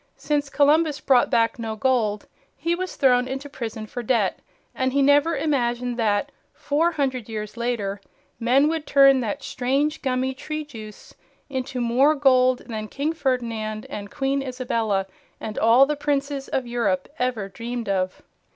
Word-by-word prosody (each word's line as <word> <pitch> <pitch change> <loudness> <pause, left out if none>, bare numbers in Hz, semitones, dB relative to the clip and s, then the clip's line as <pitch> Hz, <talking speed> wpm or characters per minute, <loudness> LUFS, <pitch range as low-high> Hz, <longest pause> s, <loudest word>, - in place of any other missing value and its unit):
Since 290 -1 -1
Columbus 300 +1 +3
brought 255 -3 +3
back 230 +1 +2
no 225 -1 -3
gold, 220 -3 0 0.3
he 335 +4 0
was 370 +1 -4
thrown 250 -2 +3
into 270 +2 -5
prison 225 -5 -6
for 245 +3 -6
debt, 225 -5 +1 0.3
and 260 0 -1
he 280 - +3
never 290 +4 +4
imagined 245 -5 0
that, 210 -3 0 0.2
four 325 +4 0
hundred 260 -6 -2
years 215 -1 -5
later, 225 -5 -2 0.4
men 255 +5 +4
would 320 -1 -2
turn 275 -1 +6
that 245 +3 -3
strange, 275 +5 -1
gummy 260 0 0
tree 305 +3 -5
juice 220 -7 -11 0.4
into 260 -1 -3
more 250 +6 +3
gold 255 -3 +3
than 215 -3 -5
King 290 +7 -2
Ferdinand 230 -7 -2
and 205 -1 -6
Queen 275 +4 -1
Isabella 230 -6 -1 0.3
and 215 -1 -5
all 235 +4 +6
the 300 +2 -1
princes 280 -1 -2
of 260 - -1
Europe 235 -7 -1
ever 245 -5 -1
dreamed 235 +3 -5
of. 185 -2 -1
255 Hz, 155 wpm, -23 LUFS, 230-280 Hz, 0.4 s, turn